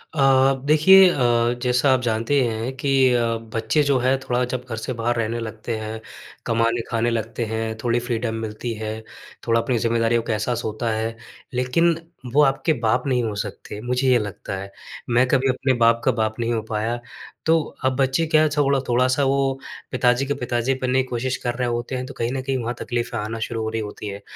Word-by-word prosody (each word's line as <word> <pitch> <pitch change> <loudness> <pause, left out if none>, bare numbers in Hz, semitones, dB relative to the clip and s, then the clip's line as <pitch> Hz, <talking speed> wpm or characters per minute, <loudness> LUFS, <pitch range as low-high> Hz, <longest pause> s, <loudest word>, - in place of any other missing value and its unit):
अ, 140 - +1 0.4
देखिए 185 +6 +7
अ, - - 0 0.5
जैसा 125 +2 +3
आप 130 - +1
जानते 115 +4 +1
हैं 115 +2 -2
कि 140 +1 -1 0.2
अ, 120 -1 +2 0.3
बच्चे 115 +7 +2
जो 140 -1 +2
है 130 +2 +2
थोड़ा 125 -1 -1
जब 125 0 -3
घर 115 - -3
से 125 +3 -4
बाहर 120 +1 +1
रहने 115 0 -1
लगते 110 +1 -5
हैं, 110 +1 -6 0.4
कमाने-खाने 115 0 0
लगते 115 0 -2
हैं, 110 0 -2
थोड़ी 120 0 +2
फ़्रीडम 120 -1 -2
मिलती 110 +2 -5
है, 110 0 -3 0.5
थोड़ा 115 0 +3
अपनी 120 0 0
ज़िम्मेदारियों 115 0 +1
का 115 - -2
एहसास 120 +3 -1
होता 110 +2 -2
है, 110 +1 -2 0.4
लेकिन 140 +7 +2 0.4
वो 150 - +5
आपके 140 +4 +2
बाप 120 0 0
नहीं 125 -3 +1
हो 110 -2 -2
सकते, 100 0 -6
मुझे 125 +2 0
ये 125 - +5
लगता 100 -2 -5
है। 100 +1 -7 0.4
मैं 125 +2 +3
कभी 135 +1 +2
अपने 130 +1 +1
बाप 115 0 +4
का 130 - +5
बाप 110 -1 -2
नहीं 120 0 0
हो 110 - 0
पाया। 110 +2 -1 0.5
तो 165 0 +4 0.3
अब 130 0 +2
बच्चे 135 +4 +2
क्या 155 0 +4
थोड़ा 140 -1 +3
थोड़ा-सा 130 +3 +2
वो 135 0 +1 0.3
पिताजी 125 +1 +2
के 145 - -1
पिताजी 125 0 -1
बनने 130 +1 +2
की 130 - -6
कोशिश 130 +2 -2
कर 120 -1 -1
रहे 125 -1 -1
होते 120 +2 -2
हैं 125 0 -3
तो 140 - -9
कहीं 115 +1 -1
न 135 - -2
कहीं 130 0 -1
वहाँ 120 +1 -2
तकलीफ़ें 120 -1 -3
आना 110 +2 -4
शुरू 115 0 -3
हो 110 - -2
रही 110 0 -2
होती 105 0 -7
हैं। 100 0 -6
120 Hz, 205 wpm, -22 LUFS, 115-130 Hz, 0.5 s, देखिए